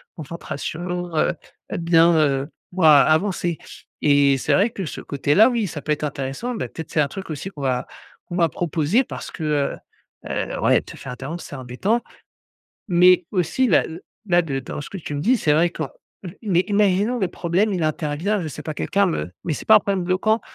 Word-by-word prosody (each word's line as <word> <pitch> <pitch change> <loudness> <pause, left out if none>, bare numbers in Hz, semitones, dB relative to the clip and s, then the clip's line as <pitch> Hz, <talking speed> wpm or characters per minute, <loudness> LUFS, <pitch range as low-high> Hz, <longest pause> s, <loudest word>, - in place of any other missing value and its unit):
concentration, 170 +3 -5
heu 155 - +2 0.4
heu, - - -2
bien, 170 0 +4
heu, 140 -3 +2 0.2
moi 160 -6 +6
avancer 170 +1 +1 0.4
et 140 -2 +4
c'est - - +1
vrai 205 +4 +4
que 195 -5 -5
ce - - -6
côté-là, 145 - +3
oui, 230 -4 0
ça 155 -3 -6
peut 150 - -2
être 150 - -1
intéressant, 140 - -3
bah, - - -3
peut-être 160 -2 -8
c'est 155 - +2
un 145 - +2
truc 190 +4 -8
aussi 155 +5 -5
qu'on 150 - -10
va 130 -2 0 0.4
qu'on - - -10
m'a 170 -2 +3
proposé 165 - +1
parce - - -7
que, 160 - -7
heu 150 -2 0 0.5
heu, - - -3
ouais, - - +4
te - - -12
faire - - -8
interrompre 145 +7 -6
c'est - - -9
embêtant. 130 - -1 0.9
Mais 180 0 +5
aussi 200 +7 +1
là 190 - +4
l 165 +3 -8 0.3
là 175 -2 +4
de 140 -5 -3
dans 135 - -6
ce - - -9
que 195 - -6
tu 155 -4 -6
me 145 - -3
dis 245 +9 +3
c'est 150 -8 +2
vrai 165 +3 +3
quand 155 -5 -5 0.5
mais 185 -5 +3
imaginons 205 +3 +2
le 190 - +1
problème, 180 +5 0
il 175 -3 -1
intervient 155 +6 -1
je 165 - -4
sais 140 - -8
pas, 155 - -4
quelqu'un 200 +6 +1
me 90 - -3
mais 165 - 0
c'est - - -7
pas 220 - +7
un - - +8
problème 195 -2 -1
bloquant 205 +5 +1
170 Hz, 205 wpm, -22 LUFS, 150-195 Hz, 0.9 s, un